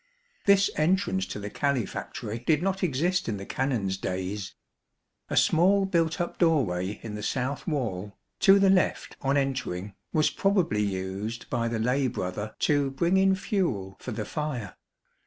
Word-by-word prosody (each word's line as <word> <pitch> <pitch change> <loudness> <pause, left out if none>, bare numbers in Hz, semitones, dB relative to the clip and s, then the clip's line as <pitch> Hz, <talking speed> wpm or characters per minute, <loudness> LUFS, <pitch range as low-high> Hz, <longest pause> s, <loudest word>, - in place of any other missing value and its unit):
This 200 0 +5
entrance 155 - +1
to 95 - -5
the 105 0 -6
calefactory 120 -4 -2
did 150 +6 +1
not 195 0 0
exist 180 0 +1
in 105 - -2
the 100 - -7
Canons' 115 -9 -1
days. 95 +1 -4 0.7
A - - -1
small 195 +4 +4
built 165 -2 +1
up 175 - -3
doorway 105 - +1
in 110 - -6
the 105 - -5
south 130 - -2
wall, 105 - -3 0.2
to 195 -1 +7
the 195 -1 +5
left 185 -1 +1
on 140 +1 +2
entering, 115 -9 -2 0.2
was 155 -1 +2
probably 185 - +1
used 100 +3 -3
by 115 -1 0
the 115 -1 -1
lay 125 +4 +1
brother 105 -2 -4
to 145 -2 +2
bring 170 +7 +1
in 190 0 +4
fuel 125 - -1
for 125 - -6
the 105 -1 -3
fire. 130 - -4
130 Hz, 155 wpm, -27 LUFS, 105-170 Hz, 0.7 s, to